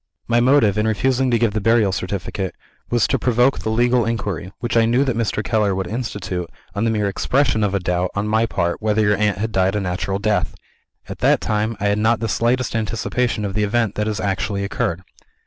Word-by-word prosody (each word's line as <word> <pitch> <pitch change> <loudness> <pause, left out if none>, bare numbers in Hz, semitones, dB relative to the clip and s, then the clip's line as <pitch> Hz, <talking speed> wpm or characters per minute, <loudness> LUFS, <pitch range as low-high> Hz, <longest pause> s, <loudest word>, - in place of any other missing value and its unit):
My 120 0 +3
motive, 120 -5 +4
in 105 - +1
refusing 130 +4 +1
to 120 - +3
give 115 -2 +1
the 110 - -1
burial 110 -2 +3
certificate, 95 0 -4 0.3
was 120 -3 +2
to 135 - 0
provoke 125 +3 +2
the - - -3
legal 120 +2 +2
inquiry, 105 -5 -3
which 120 +1 -3
I 115 -1 +5
knew 120 +4 +3
that 130 -4 -1
Mr. 110 -2 -1
Keller 105 -2 +1
would 95 0 -2
institute, 95 -5 -4 0.2
on 100 - -1
the - - +2
mere 105 -2 0
expression 125 +3 +1
of 100 -1 0
a - - +1
doubt, 90 0 -1
on 100 +1 -1
my 110 +2 +2
part, 85 -2 -1
whether 110 0 +1
your 105 0 +3
aunt 105 -3 +1
had 110 +3 -2
died 95 -1 +1
a - - +1
natural 95 +1 -2
death. 100 -2 0 0.5
At - - -8
that - - +3
time, 110 +1 -1
I 100 - -2
had 105 +1 +1
not 110 +1 +2
the 115 - -2
slightest 120 +3 0
anticipation 115 0 -1
of 100 - -3
the 105 +1 0
event 110 0 0
that 105 0 -2
has 105 -1 -2
actually 100 0 -1
occurred. 90 -3 -2
105 Hz, 220 wpm, -20 LUFS, 100-115 Hz, 0.5 s, I